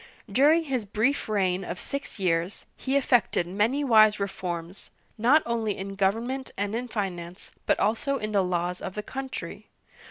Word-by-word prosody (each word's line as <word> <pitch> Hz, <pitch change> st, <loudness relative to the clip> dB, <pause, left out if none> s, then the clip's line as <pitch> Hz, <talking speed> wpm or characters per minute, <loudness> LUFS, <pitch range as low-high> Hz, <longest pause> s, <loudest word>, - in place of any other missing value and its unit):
During 290 Hz, +10 st, +4 dB
his 265 Hz, -6 st, -2 dB
brief 220 Hz, +6 st, 0 dB
reign 190 Hz, -3 st, +1 dB
of 180 Hz, 0 st, -5 dB
six 280 Hz, 0 st, -5 dB
years, 175 Hz, 0 st, 0 dB
he 270 Hz, +1 st, 0 dB
effected 245 Hz, -9 st, +2 dB
many 210 Hz, +10 st, +1 dB
wise 215 Hz, -5 st, +6 dB
reforms, 180 Hz, -2 st, -5 dB, 0.3 s
not 255 Hz, +8 st, +4 dB
only 225 Hz, -3 st, -1 dB
in 195 Hz, +1 st, -5 dB
government 230 Hz, +7 st, -1 dB
and 200 Hz, +1 st, -2 dB
in 245 Hz, +2 st, -2 dB
finance, 180 Hz, -5 st, -5 dB, 0.2 s
but -, -, +3 dB
also 275 Hz, +6 st, +1 dB
in 215 Hz, -3 st, -4 dB
the 200 Hz, -2 st, +3 dB
laws 180 Hz, 0 st, -1 dB
of 185 Hz, -, -6 dB
the 210 Hz, -, -3 dB
country. 265 Hz, +2 st, -6 dB
210 Hz, 160 wpm, -27 LUFS, 190-255 Hz, 0.3 s, wise